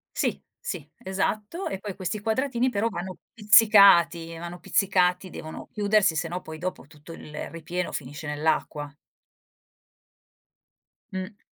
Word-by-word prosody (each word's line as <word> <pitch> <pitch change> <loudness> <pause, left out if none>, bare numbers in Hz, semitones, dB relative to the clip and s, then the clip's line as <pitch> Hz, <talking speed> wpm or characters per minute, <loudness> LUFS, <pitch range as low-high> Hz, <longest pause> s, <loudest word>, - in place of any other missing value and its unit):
Sì, - - -1 0.2
sì, 155 -6 -6
esatto, 210 - -2
e 195 - -3
poi 200 -1 -6
questi 195 +2 -3
quadratini 245 +3 0
però 225 -1 0
vanno 185 -2 -6 0.2
pizzicati! 200 -6 +6
Vanno 175 +1 -7
pizzicati, 185 -1 +2
devono 155 -2 -8
chiudersi 205 -4 +2
se 160 +2 -1
no 180 +2 -4
poi 160 -2 -8
dopo 180 -3 -5
tutto 150 +1 -14
il 150 -2 -7
ripieno 170 +2 -4
finisce 145 +3 -6
nell'acqua. 150 -1 -1 2.2
Mh. 190 +2 -5
180 Hz, 125 wpm, -26 LUFS, 165-205 Hz, 2.2 s, pizzicati